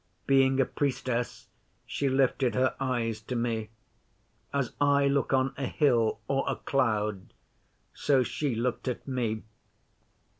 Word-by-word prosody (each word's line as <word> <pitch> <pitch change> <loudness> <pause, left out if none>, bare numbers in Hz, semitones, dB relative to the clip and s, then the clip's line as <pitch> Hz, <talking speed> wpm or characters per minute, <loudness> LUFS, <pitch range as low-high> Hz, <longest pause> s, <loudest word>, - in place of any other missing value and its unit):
Being 135 -1 +4
a 135 - +5
Priestess, 125 -3 -2 0.4
she 140 - -1
lifted 130 -2 +2
her 130 0 +2
eyes 120 -4 -1
to 125 - -5
me. 115 -2 -1 0.8
As 140 -4 -1
I 140 0 +4
look 140 0 +1
on 130 0 +2
a 135 -1 -2
hill 120 -8 +2
or 135 0 +1
a 135 - 0
cloud, 105 -7 -1 0.6
so 135 -3 +2
she 135 0 -2
looked 125 +3 -2
at 125 - -3
me. 115 -5 -2
130 Hz, 135 wpm, -29 LUFS, 115-135 Hz, 0.8 s, a